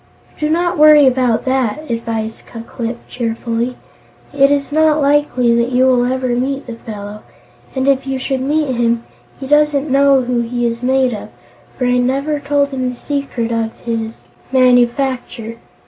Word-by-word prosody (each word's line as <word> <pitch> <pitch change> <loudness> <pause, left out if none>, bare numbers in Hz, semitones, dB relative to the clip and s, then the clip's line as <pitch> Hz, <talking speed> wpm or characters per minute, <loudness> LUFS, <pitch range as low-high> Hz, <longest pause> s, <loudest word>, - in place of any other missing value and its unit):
"Don't 340 +3 0
worry 300 -1 +7
about 250 -3 +2
that," 260 0 0
advised 225 -2 -4
Ku 230 - -8
Klip 235 0 -5
cheerfully; 235 +1 -3 0.6
"it 275 -1 +4
is 285 0 0
not 310 0 +3
likely 280 -4 +2
that 235 +1 +1
you 255 +1 +3
will 250 -2 +3
ever 260 -1 -2
meet 265 +3 -1
the 240 - -7
fellow. 210 -2 -8 0.5
And, 260 0 -1
if 270 -1 +2
you 270 0 -1
should 265 0 -2
meet 290 0 0
him, 235 0 0 0.4
he 270 - -6
doesn't 295 0 +2
know 275 0 +4
who 245 0 -1
he 240 +1 -2
is 235 0 -2
made 260 0 +2
of, 210 - -7 0.5
for 250 - -1
I 250 0 +2
never 275 +4 0
told 285 0 0
him 255 -2 -2
the 250 - -6
secret 275 -4 -3
of 225 -1 -1
his 225 -1 -4 0.2
manufacture. 245 -2 +1
255 Hz, 160 wpm, -16 LUFS, 235-280 Hz, 0.6 s, worry